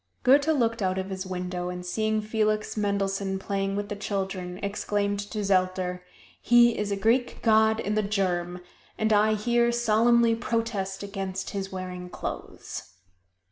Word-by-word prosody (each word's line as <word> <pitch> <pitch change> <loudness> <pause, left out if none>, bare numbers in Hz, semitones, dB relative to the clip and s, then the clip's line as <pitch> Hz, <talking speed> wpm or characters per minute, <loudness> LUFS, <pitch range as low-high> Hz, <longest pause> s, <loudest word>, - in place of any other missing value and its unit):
Goethe 280 +3 +5
looked 235 -8 +1
out 185 -1 0
of 190 +1 -3
his 190 0 -4
window 180 -1 -3
and 180 0 -6
seeing 215 +4 0
Felix 215 0 0
Mendelssohn 200 -2 -1
playing 195 0 -2
with 205 0 -2
the 205 - -4
children, 190 -3 -3
exclaimed 200 0 -1
to 205 +1 -4
Zelter, 185 -2 0 0.4
"He 240 0 +5
is 210 -1 -2
a - - +1
Greek 230 +5 +1
god 220 -1 +4
in 210 - -1
the 215 - +2
germ, 180 -3 -1 0.4
and 220 0 +2
I 215 +1 +4
here 235 +2 +2
solemnly 235 0 +3
protest 225 -4 -2
against 195 -1 -4
his 195 -1 -4
wearing 180 -1 -6
clothes." 95 - -7
200 Hz, 150 wpm, -27 LUFS, 190-220 Hz, 0.4 s, Goethe